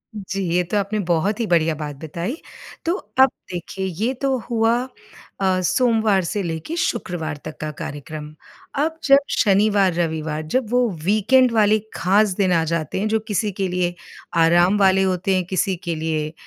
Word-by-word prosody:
जी, 195 -1 -4
ये 180 - +3
तो 200 +5 -2
आपने 205 +2 -1
बहुत 185 +6 +1
ही 230 - 0
बढ़िया 165 -3 +2
बात 150 -1 -6
बताई, 170 - -4 0.5
तो 335 - +2 0.3
अब 265 0 +8 0.2
देखिए 180 +2 -5
ये 200 +8 -1
तो 270 -1 +1
हुआ 225 -1 +2 0.7
अ, 185 -1 +2
सोमवार 220 -1 +2
से 205 +4 -2
लेके 165 - -4
शुक्रवार 175 - -2
तक 155 - -7
का 155 0 -3
कार्यक्रम, 150 +1 -7 0.4
अब 320 +3 -1
जब 275 0 +6 0.2
शनिवार 200 -2 +3
रविवार, 160 -2 -2
जब 225 +9 -1
वो 245 -1 +3
वीकेंड 220 +7 +4
वाले 215 -1 +3 0.2
ख़ास 205 +4 +3
दिन 190 -2 +2
आ 165 -1 +3
जाते 165 0 -2
हैं 210 - 0
जो 220 +1 +1
किसी 210 0 0
के 195 0 -2
लिए 180 -1 -1 0.5
आराम 175 +4 +4
वाले 190 -1 +4
होते 190 +1 0
हैं 185 - +1
किसी 190 +1 0
के 170 -2 -2
लिए 155 -1 -2
190 Hz, 170 wpm, -21 LUFS, 165-215 Hz, 0.7 s, अब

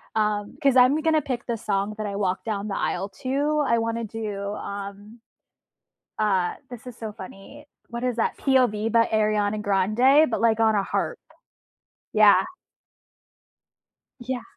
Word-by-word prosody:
Um, 210 -1 -1
'cause 275 -2 +4
I'm 255 +4 +5
gonna 315 -1 +2
pick 250 -4 -4
the 235 -2 -2
song 200 0 -2
that 215 -1 -3
I 200 - -4
walk 190 -2 -1
down 210 -2 -3
the 195 - -3
aisle 195 - -2
to. 290 +3 0
I 235 - +3
wanna 230 0 -2
do, 205 -2 -5
um 200 +3 -8 1.0
uh, 190 -4 +1
this 245 -1 -10
is 250 - -8
so 220 -2 -6
funny. 205 +8 -12 0.2
What 235 +1 -5
is 250 -2 0
that? 225 - 0
"POV" 245 -5 +2
by 230 0 +4
Ariana 215 -1 +1
Grande, 215 +10 +3
but, 230 - -1
like, 225 -1 +3
on 220 -1 +3
a 200 - +1
harp. - - -2 0.9
Yeah. 210 -2 +6 1.8
Yeah. 250 0 -4
220 Hz, 150 wpm, -24 LUFS, 205-250 Hz, 1.8 s, Yeah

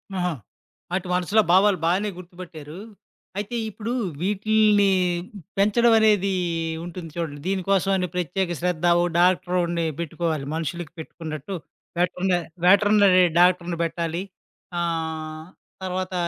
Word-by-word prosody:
ఆహా! 180 -2 0 0.6
ఆటి 185 0 -1
మనసులో 180 +5 +3
భావాలు 190 +2 +5
బానే 190 +5 +1
గుర్తుపట్టారు. 175 -4 -10 0.6
అయితే 210 +4 -3
ఇప్పుడు 220 +2 -5 0.3
వీటిల్ని 210 +1 +3 0.7
పెంచడం 225 +4 +4
అనేది 205 -3 +3 0.5
ఉంటుంది 175 -1 -7
చూడండి. 160 -4 -4
దీనికోసం 195 0 +1
అని 180 - -1
ప్రత్యేక 180 +1 -1
శ్రద్ధ 175 -1 -1 0.2
ఓహ్! 175 - +1
డాక్టరు‌ని 175 -1 +2
పెట్టుకోవాలి 160 -3 -2
మనుషులకి 165 0 -4
పెట్టుకున్నట్టు. 160 +2 -6 0.4
వెటర్న 180 +1 0 0.3
వెటర్నరీ 200 -1 +6 0.2
డాక్టర్‌ని 175 -1 +3
పెట్టాలి. 165 +2 -2 0.6
ఆహ్, 160 -1 -3 0.4
తర్వాత 185 0 -3
180 Hz, 105 wpm, -24 LUFS, 170-195 Hz, 0.7 s, వెటర్నరీ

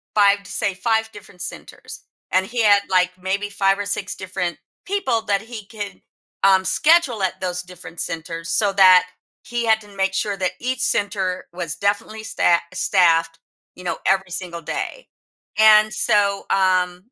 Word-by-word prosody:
5 200 -1 +5
s 200 - -14
say, 200 - -1
5 220 +3 0
different 180 -5 -14
centers, - - -9 0.3
and 190 +1 +2
he 235 +1 -2
had, 205 -1 +5
like, 180 -1 +3
maybe 200 +2 -2
5 195 0 +1
or 205 - -3
6 200 -1 -3
different 180 -3 -4 0.3
people 315 - 0
that 200 -2 0
he 225 -3 -9
could, 205 -1 -8 0.4
um, 190 -1 +5
schedule 280 - +3
at 190 - -2
those 180 -1 -2
different 180 -2 -11
centers, 165 0 -4
so 200 -2 +2
that 185 -2 +7 0.4
he 240 -1 -3
had 220 -1 +3
to 205 -1 -16
make 195 0 0
sure 200 0 -1
that 185 -1 -1
each 255 0 -2
center 200 -4 -1
was 170 -3 -4
definitely 215 +2 -2
sta 175 -5 +2 0.2
staffed, 165 -4 +2 0.4
you 180 - -12
know, 175 - -2
every 190 -1 +2
single 175 -2 -5
day. - - -5 0.5
And, 215 0 +6
so, 200 -3 +1
um 185 -2 +1
195 Hz, 165 wpm, -21 LUFS, 180-215 Hz, 0.5 s, that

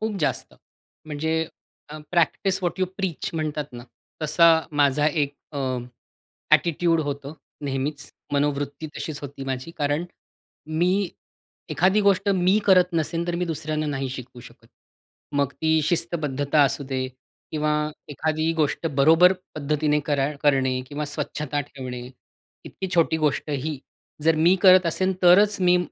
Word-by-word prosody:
खूप 220 -1 -2
जास्त. 150 - -2 0.5
म्हणजे 155 +1 -2 0.5
अ, 155 +1 -8
प्रॅक्टिस 180 +3 +1
व्हॉट 175 +2 -2
यू - - +4
प्रीच 190 -5 -3
म्हणतात 155 -2 -2
ना, 120 -1 -8 0.4
तसा 155 +2 +4 0.3
माझा 145 +1 +3
एक 145 -2 0 0.2
अ, 145 - -4 0.9
ॲटिट्यूड 170 0 +3
होतं. 140 -1 -4 0.3
नेहमीच. 140 +2 -3 0.2
मनोवृत्ती 145 +1 -1
तशीच 155 -2 -5
होती 140 -1 -7
माझी. 130 +3 -4
कारण 145 +3 0 0.7
मी 180 +2 +2 0.6
एखादी 190 +4 +3
गोष्ट, 200 0 +2
मी 190 +1 +3
करत 185 -2 +6
नसेल 165 +1 -1
तर 175 - -1
मी - - +1
दुसऱ्यांना 155 -1 -2
नाही 135 -2 -2
शिकवू 125 -1 -9
शकत. - - -16 0.7
मग 140 -1 +1
ती 160 0 +1
शिस्तबद्धता 150 -4 +1
असू 140 +1 +1
दे 130 -1 -2 0.5
किंवा 150 -1 0 0.4
एखादी 155 +2 -1
गोष्ट 150 +2 0
बरोबर 165 +6 +6 0.2
पद्धतीने 150 0 0
कर 145 -2 +1 0.2
करणे 135 -3 +2
किंवा 150 +2 -4
स्वच्छता 145 0 -3
ठेवणे, 130 -2 -7 0.6
इतकी 190 - -6
छोटी 165 -2 +3
गोष्टही 150 -1 -1 0.4
जर 165 +1 +4
मी 165 +4 +5
करत 185 -1 +7
असेल, 185 +3 +1
तरच 200 +4 +6
मी 180 -1 +4
155 Hz, 135 wpm, -24 LUFS, 145-170 Hz, 0.9 s, करत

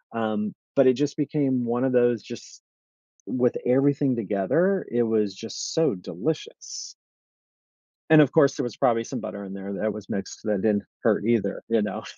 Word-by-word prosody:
um, 110 -2 -2 0.2
but 135 -1 +7
it 130 - +6
just 145 +4 -2
became 135 -4 0
one 120 +2 0
of 135 - +2
those 120 -3 +3
just - - -11 0.7
with 125 -1 +1
everything 135 +1 +3
together, 115 - +1
it 120 0 +2
was 105 -4 0
just 115 +1 -6
so 160 -7 +3
delicious. 90 - -5 1.1
And, 155 -1 +8
of 140 - +3
course, 140 -4 +4
there - - -2
was 120 - -5
probably 115 -1 +2
some - - -5
butter 100 0 -6
in 95 0 -8
there 100 0 -6
that 105 +1 -2
was 105 -2 -10
mixed 95 +2 -5
that 105 -3 -1
didn't 105 -1 +1 0.2
hurt - - +2
either, 115 -4 0
you 115 -1 +3
know. 105 -2 -4
115 Hz, 175 wpm, -25 LUFS, 105-135 Hz, 1.1 s, And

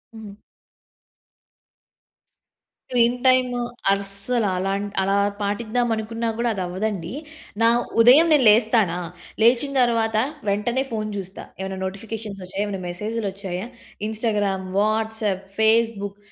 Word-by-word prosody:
హ్మ్. 210 -2 -10 2.6
Screen 240 0 +3
time 255 -1 +3 0.3
అస్సలు 200 +4 -1
అలాంటి 200 +2 -2
అలా 195 +1 +1 0.3
పాటిద్దాం 225 +4 -1
అనుకున్నా 230 +1 -3
కూడా 235 0 0
అదవ్వదండి. 185 -1 -3 0.5
నా 230 - +6 0.3
ఉదయం 270 +8 +7
నేను 275 -5 +4
లేస్తానా, 215 -5 +4 0.4
లేచిన 245 +4 +4
తర్వాత 230 -2 +1 0.3
వెంటనే 235 +6 0
ఫోన్ 215 -1 -2
చూస్తా, 190 0 -7 0.2
ఎమన్నా 190 0 -4
నోటిఫికేషన్స్ 200 +1 -6
వచ్చాయా! 190 +3 -3
ఏమైనా 195 -2 -4
మెసేజ్‌‌లోచ్చాయా! 195 0 -4 0.4
Instagram, 210 -4 -1
WhatsApp, 215 -2 0 0.2
Facebook 220 -2 +2
215 Hz, 100 wpm, -23 LUFS, 195-230 Hz, 2.6 s, ఉదయం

